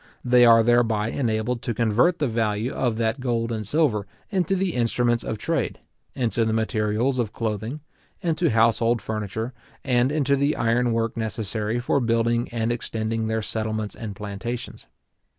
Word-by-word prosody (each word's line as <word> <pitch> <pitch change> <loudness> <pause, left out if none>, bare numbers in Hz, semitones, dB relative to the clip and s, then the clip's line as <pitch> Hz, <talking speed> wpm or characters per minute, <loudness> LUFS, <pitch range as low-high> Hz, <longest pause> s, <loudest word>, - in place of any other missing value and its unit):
They 125 0 +6
are 115 -1 +7
thereby 115 -2 +2
enabled 115 -1 -1
to 120 - -3
convert 120 - +3
the 150 - 0
value 110 +1 -1
of 120 -4 0
that 115 +3 0
gold 120 -2 -1
and 110 -3 -3
silver 120 - +1 0.2
into 190 -1 +1
the 190 -2 0
instruments 120 0 +1
of 110 - -3
trade, 165 +7 -1 0.4
into 120 -2 0
the 110 0 0
materials 110 +3 0
of 110 -3 -1
clothing, 110 +5 -3 0.4
into 170 -2 +1
household 115 +1 +3
furniture, 110 +3 -4 0.3
and 125 0 +2
into 140 -2 +2
the 140 +2 +1
iron 120 +1 +1
work 115 0 0
necessary 110 0 -2
for 125 +3 +1
building 115 0 +1
and 115 -1 -1
extending 110 -1 -2
their 110 0 -1
settlements 110 -1 -3
and 110 -4 -7
plantations. 105 +4 -6
115 Hz, 155 wpm, -24 LUFS, 110-125 Hz, 0.4 s, are